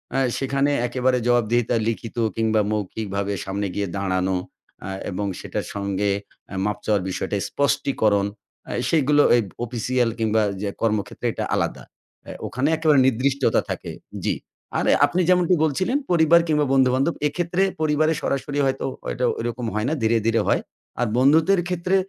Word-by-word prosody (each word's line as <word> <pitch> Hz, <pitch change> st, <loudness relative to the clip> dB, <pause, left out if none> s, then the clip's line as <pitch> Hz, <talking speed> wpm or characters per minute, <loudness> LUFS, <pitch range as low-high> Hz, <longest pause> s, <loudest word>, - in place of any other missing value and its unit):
আ -, -, +2 dB, 0.2 s
সেখানে 135 Hz, +1 st, +1 dB, 0.2 s
একেবারে 125 Hz, +1 st, +1 dB
জবাবদিহিতা 120 Hz, 0 st, +2 dB
লিখিত 115 Hz, +1 st, -4 dB, 0.2 s
কিংবা 110 Hz, -1 st, +2 dB
মৌখিকভাবে, 100 Hz, -1 st, -2 dB
সামনে 100 Hz, +1 st, -2 dB
গিয়ে 100 Hz, -1 st, -1 dB
দাঁড়ানো, 95 Hz, -1 st, 0 dB, 0.5 s
আ -, -, -4 dB, 0.2 s
এবং 100 Hz, +2 st, -2 dB
সেটার -, -, -4 dB
সঙ্গে 100 Hz, 0 st, -1 dB, 0.4 s
অ্যা 95 Hz, -, -6 dB
মাফ 105 Hz, -, -1 dB
চাওয়ার 105 Hz, -3 st, +2 dB
বিষয়টা, 95 Hz, +2 st, -3 dB
স্পষ্টীকরণ 110 Hz, -7 st, +1 dB, 0.4 s
আ -, -, -4 dB, 0.2 s
সেইগুলো 145 Hz, -2 st, +4 dB
এই 120 Hz, -, +4 dB, 0.2 s
অফিসিয়াল 120 Hz, +1 st, 0 dB
কিংবা 110 Hz, 0 st, +2 dB, 0.2 s
যে 105 Hz, -, -1 dB
কর্মক্ষেত্রে 110 Hz, -3 st, -1 dB
এটা -, -, -3 dB
আলাদা। -, -, -2 dB, 0.4 s
অ্যা -, -, -7 dB
ওখানে 130 Hz, +3 st, -1 dB
একেবারে 155 Hz, -3 st, +4 dB
নির্দিষ্টতা 130 Hz, 0 st, +2 dB
থাকে, -, -, -4 dB, 0.3 s
জি। -, -, +1 dB, 0.4 s
আরে -, -, +2 dB
আপনি 185 Hz, -, 0 dB
যেমনটি 180 Hz, 0 st, +4 dB
বলছিলেন, 185 Hz, -, +1 dB
পরিবার 170 Hz, 0 st, +6 dB
কিংবা 150 Hz, -2 st, +2 dB
বন্ধুবান্ধব; 130 Hz, +4 st, +3 dB
এক্ষেত্রে 175 Hz, +4 st, -1 dB, 0.2 s
পরিবারে 155 Hz, +1 st, +2 dB
সরাসরি 140 Hz, +1 st, -2 dB
হয়তো, 135 Hz, 0 st, -1 dB, 0.2 s
হয়তো 125 Hz, -, -1 dB
ঐরকম 120 Hz, +1 st, -3 dB
হয় 105 Hz, +3 st, 0 dB
না, -, -, 0 dB
ধীরে, 115 Hz, +1 st, +3 dB
ধীরে 115 Hz, 0 st, +3 dB
হয়। -, -, +2 dB, 0.4 s
আর 120 Hz, -, +1 dB
বন্ধুদের 160 Hz, +9 st, +4 dB
ক্ষেত্রে 180 Hz, +1 st, 0 dB
125 Hz, 150 wpm, -23 LUFS, 105-150 Hz, 0.5 s, পরিবার